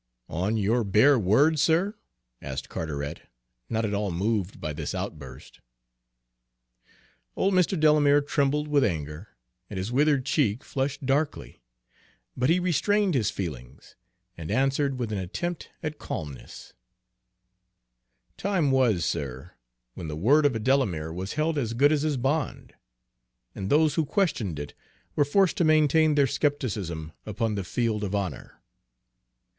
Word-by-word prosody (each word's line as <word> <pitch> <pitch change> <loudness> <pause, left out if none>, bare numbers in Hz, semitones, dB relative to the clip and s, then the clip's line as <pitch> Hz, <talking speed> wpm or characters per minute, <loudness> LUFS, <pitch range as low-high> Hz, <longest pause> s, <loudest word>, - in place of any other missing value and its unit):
"On 95 +7 -1
your 110 +4 +1
bare 110 +7 +4
word, 140 - +3
sir?" 165 +7 +2 0.5
asked - - -6
Carteret, 70 -3 -4 0.5
not 110 0 0
at 105 - -2
all 100 0 -1
moved 100 +2 -1
by 75 - -4
this - - -4
outburst. 65 -5 -7 1.8
Old 195 +1 +1
Mr. 185 -1 +2
Delamere 150 -2 +5
trembled 145 +1 0
with 145 -2 +3
anger, 80 -1 -3 0.4
and 100 - -6
his 95 +5 -3
withered 140 0 +2
cheek 135 -3 +1
flushed 135 -1 -3
darkly, 140 - -1 0.7
but 125 +2 +1
he 170 +2 +4
restrained 185 +3 +1
his 115 -6 +1
feelings, 70 - -7 0.4
and 80 -1 -8
answered 135 0 +1
with 120 -3 -3
an 105 - -2
attempt 170 - -4
at 155 -1 -4
calmness: 75 -4 -7 1.6
"Time 180 -8 +1
was, 120 -10 +2
sir, 70 +4 -4 0.4
when 85 - -7
the 75 - -4
word 145 - +4
of 135 - -2
a - - -1
Delamere 105 - 0
was 95 +3 -5
held 155 0 0
as 115 -3 -2
good 145 +5 +4
as 150 -2 +2
his 150 -2 0
bond, 135 +4 -2 0.8
and 95 0 -5
those 155 +2 +4
who 160 - +1
questioned 140 - 0
it 75 0 -6 0.4
were 145 - +4
forced 190 +7 +2
to 175 - +2
maintain 155 0 +4
their 140 -1 +4
skepticism 105 - -2
upon 110 +1 -2
the 100 -2 -2
field 110 +3 -1
of 100 0 -2
honor. 100 -2 -5
125 Hz, 140 wpm, -26 LUFS, 95-150 Hz, 1.8 s, Delamere